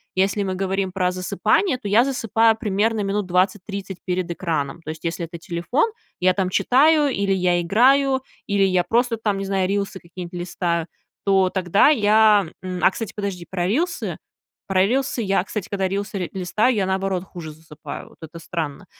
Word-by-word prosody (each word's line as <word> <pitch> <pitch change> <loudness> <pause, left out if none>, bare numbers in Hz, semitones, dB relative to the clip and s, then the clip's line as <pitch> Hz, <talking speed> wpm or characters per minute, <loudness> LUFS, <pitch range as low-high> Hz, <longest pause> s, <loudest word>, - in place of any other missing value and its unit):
если 195 +2 +1
мы 190 -1 -2
говорим 190 0 -1
про 180 -1 0
засыпание, 215 - +1
то 240 - -7
я 220 +4 +5
засыпаю 225 -4 +2
примерно 215 0 0
минут 200 +1 -1
20-30 190 +1 -1
перед 180 -1 -2
экраном. 165 -3 -3
То 155 - -9
есть 160 +1 -7
если 170 +1 -2
это 170 +1 -9
телефон- 175 - -1 0.3
я 185 0 +3
там 185 -1 -1
читаю, 290 - +4
или 200 -5 -1
я 180 -2 +2
играю, 265 +8 +3 0.3
или 200 -1 +2
я 185 -2 +3
просто, 235 +5 +1
там, 210 -3 -1
не 195 - -3
знаю, 190 -1 0
рилсы 200 -1 -2
какие-нибудь 175 0 -9
листаю. 170 -2 -2 0.4
То 190 -2 +3
тогда 185 +5 +3
я, 215 - +4
м 185 -1 -5
А, - - +6
кстати, 225 +2 -6
подожди, 200 -4 -4
про 180 -2 -2
рилсы. 325 - -1 0.5
Про 190 -1 +3
рилсы 260 0 0
я, 195 -3 +1
кстати, 205 -1 -5
когда 195 -2 0
рилсы 200 +1 -3
ри 180 -3 -3
листаю, 195 +7 +1
я 195 -3 0
наоборот 190 -1 -1
хуже 175 -4 -9
засыпаю, 155 0 -10
вот - - -21
это 165 +1 -9
странно. 160 -3 -5
195 Hz, 180 wpm, -22 LUFS, 180-215 Hz, 0.5 s, А